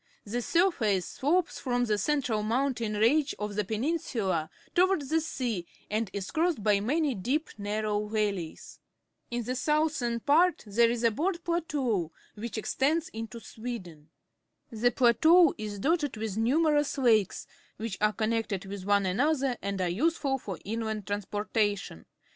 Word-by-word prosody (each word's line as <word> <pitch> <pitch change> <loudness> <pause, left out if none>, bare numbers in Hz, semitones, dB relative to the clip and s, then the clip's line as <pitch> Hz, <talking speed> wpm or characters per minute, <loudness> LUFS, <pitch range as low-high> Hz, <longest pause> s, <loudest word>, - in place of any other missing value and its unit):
The 235 +4 -2
.surface 235 - +2
slopes 330 +6 0
from 245 -2 0
the 210 -2 0
central 250 -3 0
mountain 235 -1 0
range 275 +8 +3
of 210 0 -4
the 210 +1 0
peninsula 215 - -1 0.2
toward 370 -3 +3
the 320 +4 +1
sea 240 - -3 0.2
and 215 -1 0
is 195 -1 -5
crossed 320 - 0
by 205 -1 +4
many 285 +7 +1
deep, 255 +10 -1
narrow 210 0 -1
valleys. 205 -6 -3 0.5
In 240 0 -2
the 250 +3 -3
southern 300 -4 +1
part 335 +8 +3
there 230 +3 +3
is 235 0 -2
a 230 - +4
broad 340 - -1
plateau, 275 - -1 0.2
which 230 +2 -6
extends 300 +9 0
into 225 +1 -7
Sweden. 190 -11 -8 0.6
The 235 +2 +2
plateau 315 +8 +5
is 210 -1 -4
dotted 290 - 0
with 215 -2 -3
numerous 290 +6 +2
lakes, 225 -7 +2 0.3
which 220 -2 -5
are 210 0 +4
connected 220 -3 -1
with 195 -1 -6
one 200 -1 +3
another 265 +6 +1
and 200 0 -3
are 185 - +1
useful 270 - 0
for 195 -7 -6
inland 220 -1 -3
trans 205 0 -3
portation. 205 - -1
230 Hz, 150 wpm, -29 LUFS, 205-290 Hz, 0.6 s, plateau